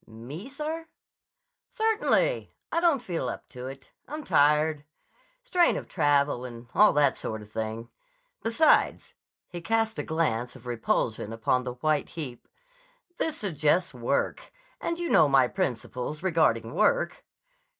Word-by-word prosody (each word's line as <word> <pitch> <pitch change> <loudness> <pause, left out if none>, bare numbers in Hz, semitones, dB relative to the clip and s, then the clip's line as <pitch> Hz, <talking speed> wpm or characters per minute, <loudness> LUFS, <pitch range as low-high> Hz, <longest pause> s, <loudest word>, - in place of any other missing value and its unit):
"Me, 130 - -9
sir?" 310 +3 -5 0.8
"Certainly. 445 +3 +1 0.2
I 335 - +2
don't 330 -7 +2
feel 165 - -2
up - - -7
to 125 0 -8
it. 135 0 -10 0.2
I'm 305 +1 -6
tired. 150 - +3 0.6
Strain 360 -9 +3
of - - -6
travel 145 -5 +2
and 120 -1 -9
all 210 - +6
that 145 -2 +3
sort 110 -1 -3
of 105 - -17
thing. 110 +1 -4 0.5
Besides"—he 225 - 0
cast 225 +3 0
a - - -1
glance 125 -7 -1
of 130 -1 -14
repulsion 115 -2 -1
upon 120 +3 0
the 125 - -3
white 150 +3 0
heap—"this 420 - -7
suggests 165 -3 +1
work. 125 +3 -2 0.3
And 335 - -2
you 345 0 -2
know 150 - +5
my 135 -2 +5
principles 125 - -3
regarding 155 -11 +2
work." - - +1
150 Hz, 130 wpm, -27 LUFS, -, 0.8 s, all